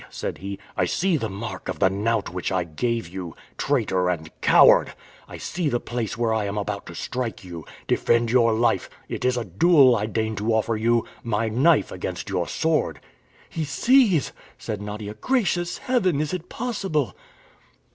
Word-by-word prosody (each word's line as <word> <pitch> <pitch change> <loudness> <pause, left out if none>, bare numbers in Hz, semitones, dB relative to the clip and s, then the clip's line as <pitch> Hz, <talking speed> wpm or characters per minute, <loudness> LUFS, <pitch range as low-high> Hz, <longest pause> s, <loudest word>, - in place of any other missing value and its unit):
said - - -5
he. 100 +1 -5 0.2
"I 90 - +2
see 180 - +1
the 115 -7 -2
mark 95 -2 -6
of - - -3
the 95 - +4
knout 105 -1 -1
which 90 0 -3
I 95 -1 +1
gave 115 +6 -2
you, 90 -1 -7 0.2
traitor 100 -10 +1
and 80 -3 -3
coward! - - +6 0.3
I - - -9
see 175 -3 -2
the 120 - 0
place 120 -2 -4
where 115 -1 +1
I 110 -2 0
am 100 +1 -3
about 100 -1 -3
to 85 - -9
strike 120 +3 -4
you! 85 -3 -8 0.2
Defend 115 -1 +2
your 120 -2 +4
life! 115 +2 +1 0.2
It - - -5
is 125 0 +2
a 120 - -2
duel 130 - +5
I 105 -1 -1
deign 110 0 -1
to 110 +3 0
offer 110 +1 +1
you! 115 +2 +2 0.2
My 110 -1 -1
knife 140 +8 +3
against 90 +1 -5
your 90 -3 -1
sword!" 160 -1 0 0.5
"He 160 - -4
sees!" 190 - +3 0.3
said 105 -2 -5
Nadia. 105 0 -6
"Gracious 180 - 0
Heaven, 190 - +1
is 155 +3 -1
it 180 0 -5
possible!" 195 - -2
115 Hz, 175 wpm, -24 LUFS, 100-145 Hz, 0.5 s, coward